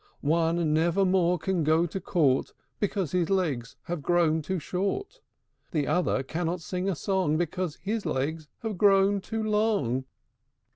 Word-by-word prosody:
One 165 +1 +1
never 170 +5 +2
more 180 -1 +3
can 180 0 -1
go 160 +3 +3
to 185 +3 -5
court, 145 -7 +1 0.3
Because 195 -6 -1
his 175 -3 +1
legs 155 -12 -1
have 175 -3 -4
grown 165 0 +2
too 185 +5 -2
short; 200 - -3 0.5
The 150 -3 0
other 175 -6 +1
cannot 170 +5 -2
sing 180 +3 -2
a 190 - 0
song, 185 -3 0
Because 175 -1 -2
his 215 +1 -1
legs 150 +4 -2 0.2
have 215 -5 -3
grown 200 0 +4
too 225 +3 -3
long!" 210 - +1
175 Hz, 150 wpm, -27 LUFS, 155-195 Hz, 0.5 s, grown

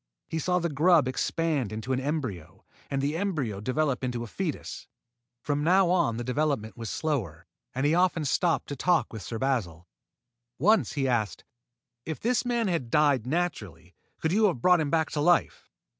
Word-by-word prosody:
He 160 - -3
saw 180 +3 +1
the 170 -1 0
grub 155 -1 +4
expand 145 -2 -1
into 110 +4 -3
an 130 - 0
embryo, 130 - -4 0.2
and 135 -1 -1
the 145 +3 0
embryo 155 - -2
develop 135 +3 -1
into 120 -2 -2
a - - -5
foetus. 160 - -5 0.6
From 145 0 -1
now 180 +2 +4
on 170 -11 +2
the 120 - -3
development 130 -3 -1
was 115 -3 -6
slower, 115 - -3 0.3
and 135 +2 0
he 150 - +3
often 175 -3 +2
stopped 165 +4 +1
to 145 - -3
talk 175 +1 +1
with 110 - -6
Sir 115 - -5
Basil. 100 -10 -2 0.7
Once 215 - +3
he 135 -2 0
asked: 115 -5 -1 0.6
"If 160 - -5
this 245 +2 +1
man 240 -2 0
had 165 -10 -1
died 140 -4 +2
naturally, 105 - -3 0.3
could 160 - 0
you 215 +4 +3
have 180 -11 +1
brought 180 +6 +4
him 150 -2 -1
back 160 +1 +1
to 150 - -1
life?" 175 +2 +2
145 Hz, 180 wpm, -27 LUFS, 120-170 Hz, 0.7 s, grub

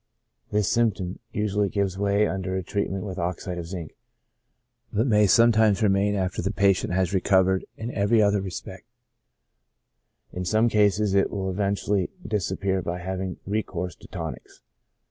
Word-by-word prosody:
This 105 -2 +1
symptom 105 -6 0
usually 105 -1 0
gives 100 -2 -1
way 100 +1 +2
under 95 -1 -3
a 95 - -2
treatment 95 0 -2
with 95 -3 -5
oxide 90 +1 -3
of 85 - -6
zinc, 85 -4 -7 1.0
but 110 +2 +1
may 105 -5 +4
sometimes 110 -1 +4
remain 100 0 +2
after 95 -2 -1
the 95 - -1
patient 100 -3 +2
has 95 0 +1
recovered 95 0 +3
in 115 +2 -5
every 105 +3 +2
other 100 -1 +3
respect; 95 -3 -7 1.5
in 90 - -3
some 110 +6 +2
cases 105 -1 +2
it 100 0 +3
will 95 -2 -3
eventually 100 0 0 0.2
disappear 95 -2 -1
by 85 0 -3
having 95 0 -4
recourse 95 -4 -3
to - - -14
tonics. - - -7
100 Hz, 145 wpm, -25 LUFS, 95-105 Hz, 1.5 s, may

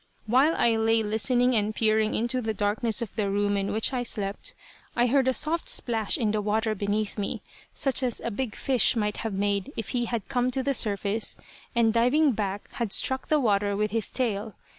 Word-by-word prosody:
While 265 +8 +3
I 230 -1 +3
lay 225 0 +2
listening 245 +4 +2
and 215 -1 0
peering 220 -1 +2
into 240 +3 -1
the 220 -2 -3
darkness 210 +3 0
of 220 - -9
the 210 -3 -1
room 205 0 0
in 195 0 -1
which 220 +4 +1
I 250 - 0
slept, 210 - -3 0.4
I 240 - +3
heard 260 +1 +2
a - - +4
soft 320 +5 0
splash 225 -4 +2
in 220 -4 0
the 215 0 -1
water 215 +1 0
beneath 205 +1 -2
me, 200 - -3 0.3
such 270 -1 +2
as 250 -3 -1
a 235 - -4
big 230 +1 -4
fish 260 -2 +3
might 210 -2 -1
have 225 -2 -4
made 200 +4 -1
if 225 - -4
he 240 -1 -1
had 230 -3 -4
come 250 -2 0
to 260 +1 -2
the 275 +1 0
surface, 210 -2 -1 0.4
and 225 -2 +3
diving 260 +6 +3
back 205 -3 -3
had 235 -4 -3
struck 260 +5 +1
the 305 - +3
water 205 -4 +1
with 210 0 -1
his 225 -2 0
tail. 215 -5 -2
225 Hz, 205 wpm, -26 LUFS, 205-245 Hz, 0.4 s, a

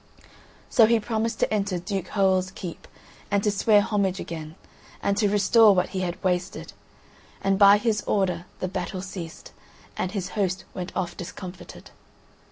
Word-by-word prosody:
So 225 -4 +5
he 230 0 +3
promised 225 +1 -2
to - - +1
enter 200 -3 0
Duke 180 +1 -4
Hoël's 190 -2 +2
keep 180 -3 -8 0.4
and 200 -1 +1
to 210 - +2
swear 205 +1 +4
homage 200 -3 0
again, 160 -1 -7 0.5
and 200 - +1
to 210 -1 +3
restore 210 +1 +5
what 180 0 +1
he 190 - -3
had 180 -2 -4
wasted; 180 0 -2 0.7
and 195 0 +2
by 200 0 +8
his 215 0 0
order 180 -4 0
the 185 - 0
battle 185 0 -4
ceased, 175 -4 -8 0.4
and 185 - -2
his 195 -3 -3
host 190 -2 -1
went 180 0 -5
off 180 -2 -2
discomfited. 180 0 -9
195 Hz, 160 wpm, -25 LUFS, 180-205 Hz, 0.7 s, by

